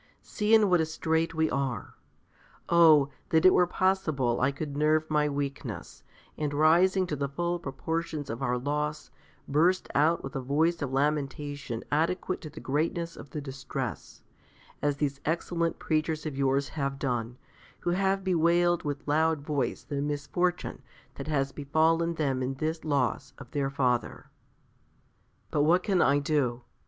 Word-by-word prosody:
See 210 Hz, +1 st, +2 dB
in 215 Hz, -2 st, +5 dB
what 180 Hz, -3 st, +4 dB
a -, -, +1 dB
strait 160 Hz, +1 st, -1 dB
we 160 Hz, 0 st, +2 dB
are. 135 Hz, -3 st, -2 dB, 0.8 s
Oh! 155 Hz, -5 st, +6 dB, 0.2 s
that 160 Hz, +2 st, +3 dB
it 185 Hz, -, +8 dB
were 180 Hz, -, +4 dB
possible 155 Hz, -11 st, +1 dB
I 140 Hz, +2 st, +3 dB
could 140 Hz, 0 st, -5 dB
nerve 155 Hz, +1 st, +2 dB
my 150 Hz, -1 st, +2 dB
weakness, 140 Hz, -1 st, -5 dB, 0.4 s
and 145 Hz, -1 st, -1 dB
rising 175 Hz, +5 st, +4 dB
to 160 Hz, -, -3 dB
the 140 Hz, -1 st, -2 dB
full 175 Hz, +5 st, -2 dB
proportions 160 Hz, +1 st, -3 dB
of 115 Hz, +3 st, -6 dB
our 125 Hz, -2 st, 0 dB
loss, 150 Hz, +3 st, -3 dB, 0.4 s
burst 170 Hz, +6 st, +2 dB
out 160 Hz, +4 st, +3 dB
with 135 Hz, +2 st, -7 dB
a 135 Hz, -, -1 dB
voice 160 Hz, +6 st, +1 dB
of 140 Hz, -2 st, -2 dB
lamentation 145 Hz, -3 st, -2 dB
adequate 170 Hz, +5 st, 0 dB
to 155 Hz, -, -7 dB
the -, -, -10 dB
greatness 165 Hz, +4 st, -1 dB
of 145 Hz, -, -11 dB
the 150 Hz, -, -5 dB
distress, 135 Hz, -3 st, -6 dB, 0.6 s
as 145 Hz, -1 st, 0 dB
these 140 Hz, -2 st, -1 dB
excellent 170 Hz, +1 st, -1 dB
preachers 155 Hz, 0 st, -1 dB
of 150 Hz, -3 st, -4 dB
yours 135 Hz, 0 st, +1 dB
have 140 Hz, -2 st, -3 dB
done, 125 Hz, -3 st, -2 dB, 0.4 s
who 175 Hz, -, 0 dB
have 195 Hz, +1 st, +1 dB
bewailed 175 Hz, -1 st, +3 dB
with 145 Hz, -1 st, -5 dB
loud 155 Hz, +1 st, +2 dB
voice 140 Hz, -5 st, -2 dB
the 140 Hz, -2 st, -3 dB
misfortune 150 Hz, +5 st, -2 dB, 0.3 s
that -, -, -8 dB
has 140 Hz, -3 st, 0 dB
befallen 160 Hz, +4 st, +1 dB
them 135 Hz, -5 st, 0 dB
in 130 Hz, +1 st, -2 dB
this 160 Hz, +3 st, -3 dB
loss 135 Hz, -3 st, -1 dB
of -, -, -12 dB
their 140 Hz, -2 st, -1 dB
father. 125 Hz, -3 st, -1 dB, 1.2 s
But 145 Hz, -, +2 dB
what 170 Hz, +5 st, +4 dB
can 190 Hz, -4 st, +2 dB
I 140 Hz, -, +4 dB
do? 140 Hz, -5 st, 0 dB
150 Hz, 160 wpm, -28 LUFS, 140-165 Hz, 1.2 s, it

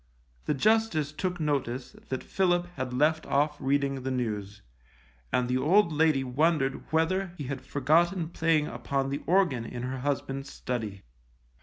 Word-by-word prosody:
The 150 Hz, -, +1 dB
Justice 210 Hz, -5 st, +2 dB
took 180 Hz, +3 st, -3 dB
notice 135 Hz, -5 st, -1 dB, 0.2 s
that 130 Hz, -, -3 dB
Philip 175 Hz, -2 st, +1 dB
had 130 Hz, -1 st, -3 dB
left 155 Hz, +5 st, +2 dB
off 150 Hz, +2 st, +1 dB
reading 140 Hz, 0 st, +1 dB
the 130 Hz, -, -3 dB
news, 105 Hz, -5 st, -3 dB, 0.7 s
and 125 Hz, -1 st, +1 dB
the 125 Hz, +1 st, +1 dB
old 170 Hz, +3 st, +4 dB
lady 155 Hz, -3 st, +3 dB
wondered 135 Hz, +1 st, 0 dB
whether 175 Hz, +3 st, +1 dB
he 145 Hz, -, -5 dB
had 135 Hz, 0 st, -4 dB
forgotten 165 Hz, +5 st, +2 dB
playing 160 Hz, -2 st, +2 dB
upon 135 Hz, -2 st, -2 dB
the 140 Hz, -, -2 dB
organ 170 Hz, -10 st, +3 dB
in 120 Hz, +1 st, -6 dB
her 130 Hz, +1 st, -3 dB
husband's 135 Hz, 0 st, -3 dB
study. 110 Hz, -6 st, -4 dB
145 Hz, 150 wpm, -28 LUFS, 130-160 Hz, 0.7 s, old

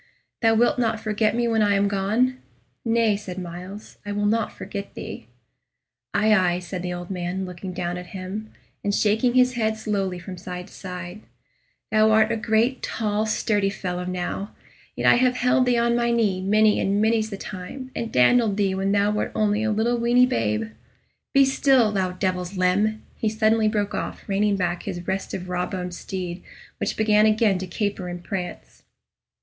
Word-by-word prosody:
"Thou 225 Hz, -1 st, +4 dB
wilt 240 Hz, +2 st, +3 dB
not 225 Hz, -2 st, +1 dB
forget 215 Hz, 0 st, 0 dB
me 240 Hz, 0 st, +1 dB
when 225 Hz, -1 st, +2 dB
I 205 Hz, -1 st, +3 dB
am 200 Hz, +1 st, +3 dB
gone?" 215 Hz, +6 st, +1 dB, 0.4 s
"Nay," 230 Hz, -2 st, +2 dB
said 195 Hz, -3 st, -7 dB
Myles; 180 Hz, +3 st, -8 dB
"I 205 Hz, -, -5 dB
will 205 Hz, 0 st, -1 dB
not 220 Hz, +1 st, +1 dB
forget 200 Hz, -1 st, -7 dB
thee." 110 Hz, -, -7 dB, 0.8 s
"Aye, 215 Hz, +1 st, +3 dB
aye," 180 Hz, -4 st, +3 dB
said 180 Hz, 0 st, -5 dB
the 180 Hz, 0 st, -3 dB
old 175 Hz, +1 st, -6 dB
man, 180 Hz, +1 st, -3 dB
looking 180 Hz, +1 st, -7 dB
down 175 Hz, 0 st, -3 dB
at 180 Hz, -, -9 dB
him, 195 Hz, +3 st, -6 dB, 0.3 s
and 205 Hz, 0 st, 0 dB
shaking 220 Hz, +4 st, +2 dB
his 255 Hz, 0 st, +5 dB
head 220 Hz, -2 st, 0 dB
slowly 195 Hz, -4 st, -2 dB
from 180 Hz, +1 st, -8 dB
side 180 Hz, 0 st, -6 dB
to -, -, -17 dB
side; 180 Hz, +1 st, -7 dB, 0.7 s
"thou 215 Hz, 0 st, +5 dB
art 220 Hz, +1 st, +4 dB
a -, -, +1 dB
great 225 Hz, +3 st, +1 dB
tall 215 Hz, 0 st, -1 dB
sturdy 205 Hz, -2 st, +1 dB
fellow 180 Hz, -2 st, -4 dB
now, 185 Hz, +2 st, -4 dB, 0.4 s
yet -, -, -3 dB
have 255 Hz, 0 st, +3 dB
I -, -, -4 dB
held 250 Hz, +1 st, +3 dB
thee 245 Hz, -1 st, +3 dB
on 235 Hz, 0 st, +2 dB
my 240 Hz, 0 st, +1 dB
knee 215 Hz, -6 st, +1 dB
many 210 Hz, +2 st, +3 dB
and 200 Hz, +1 st, +1 dB
many's 220 Hz, 0 st, +2 dB
the 200 Hz, -, -5 dB
time, 210 Hz, +9 st, -7 dB
and 230 Hz, -, -3 dB
dandled 210 Hz, -, +4 dB
thee 195 Hz, -2 st, +1 dB
when 195 Hz, +1 st, 0 dB
thou 205 Hz, 0 st, +3 dB
wert 210 Hz, -, -1 dB
only 210 Hz, 0 st, +1 dB
a 220 Hz, -, 0 dB
little 225 Hz, +3 st, +1 dB
weeny 240 Hz, +2 st, +5 dB
babe. 110 Hz, -, -1 dB, 0.6 s
Be 275 Hz, 0 st, +6 dB
still, 265 Hz, -4 st, +3 dB
thou 190 Hz, -3 st, -1 dB
devil's 185 Hz, 0 st, -2 dB
limb!" 205 Hz, +4 st, +1 dB
he 220 Hz, -, 0 dB
suddenly 220 Hz, 0 st, +2 dB
broke 210 Hz, -1 st, 0 dB
off, -, -, -5 dB
reining 205 Hz, +1 st, +2 dB
back 180 Hz, -2 st, -1 dB
his 175 Hz, -3 st, -6 dB
restive 190 Hz, -1 st, -3 dB
raw 180 Hz, 0 st, -1 dB
boned 180 Hz, -2 st, -5 dB
steed, 180 Hz, 0 st, -5 dB, 0.4 s
which -, -, -2 dB
began 215 Hz, 0 st, +4 dB
again 215 Hz, -3 st, +3 dB
to 185 Hz, -, -5 dB
caper 200 Hz, 0 st, -2 dB
and 175 Hz, 0 st, -6 dB
prance. 175 Hz, -, -6 dB
205 Hz, 185 wpm, -24 LUFS, 185-220 Hz, 0.8 s, Be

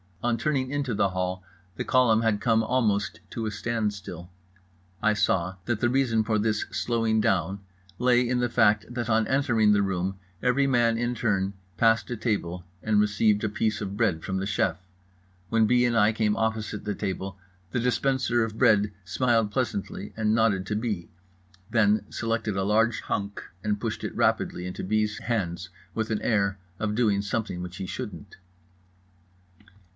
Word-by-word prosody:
On 120 Hz, -1 st, +1 dB
turning 130 Hz, 0 st, 0 dB
into 145 Hz, -4 st, -1 dB
the 100 Hz, -, +2 dB
hall 90 Hz, 0 st, -3 dB, 0.3 s
the -, -, -3 dB
column 120 Hz, -4 st, +4 dB
had 105 Hz, -2 st, +1 dB
come 115 Hz, -1 st, +3 dB
almost 110 Hz, -3 st, 0 dB
to 115 Hz, -, -3 dB
a 110 Hz, -, -2 dB
standstill. 100 Hz, -6 st, -3 dB, 0.7 s
I 110 Hz, 0 st, +3 dB
saw 95 Hz, -3 st, +1 dB
that 120 Hz, -3 st, -1 dB
the 120 Hz, -, +2 dB
reason 120 Hz, -4 st, +2 dB
for 110 Hz, 0 st, +1 dB
this 110 Hz, 0 st, +1 dB
slowing 115 Hz, -2 st, +1 dB
down 95 Hz, 0 st, +1 dB, 0.4 s
lay 125 Hz, 0 st, +3 dB
in 125 Hz, 0 st, +1 dB
the 120 Hz, 0 st, +1 dB
fact 105 Hz, -1 st, +3 dB
that 120 Hz, -2 st, -3 dB
on 110 Hz, -1 st, +3 dB
entering 120 Hz, -6 st, +3 dB
the 100 Hz, -, +3 dB
room 95 Hz, 0 st, -2 dB, 0.2 s
every 125 Hz, +2 st, +3 dB
man 120 Hz, -4 st, +3 dB
in 120 Hz, +1 st, 0 dB
turn 100 Hz, -4 st, 0 dB, 0.2 s
passed 115 Hz, -1 st, +3 dB
a 120 Hz, -, -3 dB
table 90 Hz, -6 st, -2 dB, 0.2 s
and 110 Hz, -1 st, +2 dB
received 105 Hz, 0 st, +2 dB
a 110 Hz, -, +1 dB
piece 110 Hz, 0 st, -1 dB
of 100 Hz, -1 st, -4 dB
bread 100 Hz, -9 st, +1 dB
from 95 Hz, -, -2 dB
the 95 Hz, -, -2 dB
chef. 95 Hz, -4 st, 0 dB, 0.7 s
When 115 Hz, -1 st, +3 dB
B. 125 Hz, +2 st, +4 dB
and 120 Hz, -1 st, +1 dB
I 105 Hz, 0 st, +4 dB
came 105 Hz, -1 st, +1 dB
opposite 110 Hz, -2 st, -2 dB
the 105 Hz, -, -2 dB
table 95 Hz, -1 st, -4 dB, 0.3 s
the -, -, 0 dB
dispenser 125 Hz, -1 st, +1 dB
of 110 Hz, -1 st, -4 dB
bread 105 Hz, -1 st, +4 dB
smiled 115 Hz, +2 st, +1 dB
pleasantly 105 Hz, -4 st, -3 dB
and 110 Hz, -1 st, +2 dB
nodded 110 Hz, -4 st, +2 dB
to 105 Hz, -, -1 dB
B., 105 Hz, -6 st, -3 dB, 0.6 s
then 110 Hz, -2 st, +3 dB
selected 115 Hz, -3 st, -1 dB
a 95 Hz, -, 0 dB
large 110 Hz, +2 st, +2 dB
hunk 100 Hz, 0 st, -3 dB, 0.2 s
and 105 Hz, -1 st, 0 dB
pushed 115 Hz, -3 st, -3 dB
it -, -, -4 dB
rapidly 90 Hz, -, +1 dB
into 90 Hz, -, -5 dB
B.'s 110 Hz, +2 st, 0 dB
hands 95 Hz, -6 st, -2 dB, 0.2 s
with 110 Hz, 0 st, -2 dB
an 110 Hz, -2 st, -1 dB
air 100 Hz, -4 st, +1 dB, 0.2 s
of 105 Hz, -1 st, -1 dB
doing 105 Hz, -4 st, +2 dB
something 100 Hz, -3 st, -3 dB
which 90 Hz, 0 st, -7 dB
he 95 Hz, -, -4 dB
shouldn't. 105 Hz, -2 st, -7 dB
110 Hz, 170 wpm, -26 LUFS, 100-115 Hz, 0.7 s, column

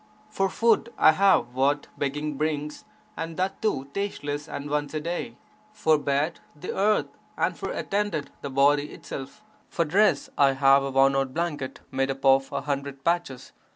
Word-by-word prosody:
For 195 Hz, -2 st, 0 dB
food, 230 Hz, +4 st, +2 dB
(I -, -, +7 dB
have) 160 Hz, -9 st, +3 dB
what 140 Hz, +3 st, +1 dB
begging 150 Hz, +1 st, -2 dB
brings 150 Hz, 0 st, -3 dB, 0.3 s
and 165 Hz, -3 st, -5 dB
that 190 Hz, +1 st, -2 dB
too 145 Hz, -12 st, 0 dB
tasteless 150 Hz, -7 st, -3 dB
and 145 Hz, -, -5 dB
once 145 Hz, 0 st, -2 dB
a -, -, 0 dB
day; 175 Hz, +9 st, -4 dB, 0.4 s
for 155 Hz, -7 st, +2 dB
bed, 145 Hz, +3 st, 0 dB, 0.2 s
the 150 Hz, -, -6 dB
earth, 210 Hz, +2 st, +2 dB, 0.3 s
and -, -, 0 dB
for -, -, -5 dB
attendant 200 Hz, -7 st, -2 dB
the 140 Hz, -, -5 dB
body 145 Hz, +2 st, +2 dB
itself; 140 Hz, +10 st, -8 dB, 0.3 s
for 170 Hz, -, 0 dB
dress, 175 Hz, -3 st, +3 dB
(I 140 Hz, -1 st, +5 dB
have) 135 Hz, +1 st, +5 dB
a 135 Hz, -, -2 dB
worn 135 Hz, 0 st, +4 dB
out 135 Hz, -1 st, -1 dB
blanket 155 Hz, -6 st, -3 dB
made 135 Hz, 0 st, 0 dB
up 135 Hz, 0 st, -4 dB
of 135 Hz, 0 st, +4 dB
a 140 Hz, -, -2 dB
hundred 140 Hz, -1 st, -4 dB
patches! 170 Hz, -7 st, -1 dB
145 Hz, 170 wpm, -26 LUFS, 135-170 Hz, 0.4 s, I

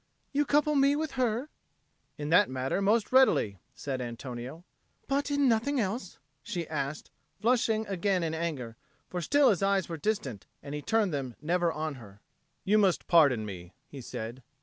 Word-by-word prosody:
"You 290 Hz, +1 st, +2 dB
couple 295 Hz, +2 st, +2 dB
me 280 Hz, 0 st, +4 dB
with 310 Hz, 0 st, -2 dB
her?" 255 Hz, +1 st, -1 dB, 0.7 s
"In 145 Hz, 0 st, -4 dB
that 180 Hz, +5 st, +5 dB
matter 130 Hz, +8 st, -1 dB
most 210 Hz, +2 st, +2 dB
readily," 185 Hz, -, +4 dB, 0.2 s
said 135 Hz, -2 st, -4 dB
Antonio. 125 Hz, +5 st, -7 dB, 0.4 s
"But 280 Hz, +1 st, 0 dB
in 285 Hz, -1 st, +2 dB
nothing 250 Hz, +4 st, +2 dB
else?" 210 Hz, -1 st, -3 dB, 0.2 s
she 170 Hz, +3 st, -4 dB
asked, 145 Hz, -1 st, -4 dB, 0.3 s
flushing 225 Hz, -2 st, +2 dB
again 195 Hz, -2 st, 0 dB
in 160 Hz, -1 st, -1 dB
anger, 145 Hz, -9 st, -4 dB, 0.3 s
for 180 Hz, -, -4 dB
still 285 Hz, -, +4 dB
his 195 Hz, -, -1 dB
eyes 195 Hz, -2 st, +2 dB
were 165 Hz, -, -5 dB
distant, 145 Hz, -, -3 dB, 0.2 s
and 140 Hz, 0 st, -7 dB
he 150 Hz, -, -3 dB
turned 215 Hz, -1 st, +1 dB
them 135 Hz, -4 st, -3 dB
never 170 Hz, +2 st, +1 dB
on 155 Hz, -1 st, -3 dB
her. 100 Hz, -2 st, -14 dB, 0.4 s
"You 210 Hz, +2 st, +3 dB
must 195 Hz, -4 st, +2 dB
pardon 140 Hz, -10 st, +4 dB
me," 90 Hz, -3 st, -8 dB, 0.2 s
he 140 Hz, -, -9 dB
said. 120 Hz, +1 st, -6 dB
175 Hz, 170 wpm, -29 LUFS, 135-225 Hz, 0.7 s, that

